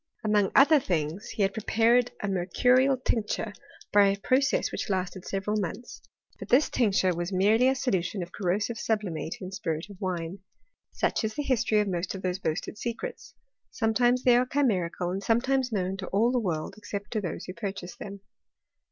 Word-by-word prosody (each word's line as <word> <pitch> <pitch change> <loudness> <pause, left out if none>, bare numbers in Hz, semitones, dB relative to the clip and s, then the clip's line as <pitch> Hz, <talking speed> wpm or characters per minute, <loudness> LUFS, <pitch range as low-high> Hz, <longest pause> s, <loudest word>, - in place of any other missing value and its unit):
Among 210 -2 +2
other 295 +2 +7
things 170 - -2
he 215 - -1
had 195 0 +1
prepared 230 +3 +3
a - - 0
mer^ 185 -2 -2
curiiil 255 +3 +3
tincture, 215 -1 -1 0.4
by 205 -1 +7
a 195 0 +1
process 265 +6 +1
which - - -4
lasted 185 -1 -2
several 195 +2 -1
months: 205 +6 -5 0.4
but - - -8
this 270 +5 +4
tincture 195 -6 +2
was 175 +2 -3
merely 210 +6 +4
a 265 - +3
solution 190 -7 -1
of 175 - -10
rorroHivc 205 +4 -1
sublimate 185 -8 -2
in 185 0 -6
spirit 165 -3 -3
of 190 - -14
wine. 180 -1 -3 0.5
Such - - 0
is 220 0 -2
the 295 - -2
hiMtory 225 -5 +2
of 210 - -2
most 180 0 -2
of 195 - -8
those 185 0 -1
boasted 170 +5 -3
secrets; 245 - -5 0.3
sometimes 240 +3 +2
they 245 -1 +6
are 250 +1 +3
chimerical, 185 -11 0
and 190 +2 -3
sometimes 250 +4 +1
known 190 -2 -1
to 190 -1 -6
all 225 +5 +2
the 250 - +1
world, 165 -8 -2
excej)t 205 0 -5
to 215 - -1
those 180 - -5
who 185 - -7
purchase 185 0 -6
them. 200 -1 -9
205 Hz, 185 wpm, -27 LUFS, 185-240 Hz, 0.5 s, other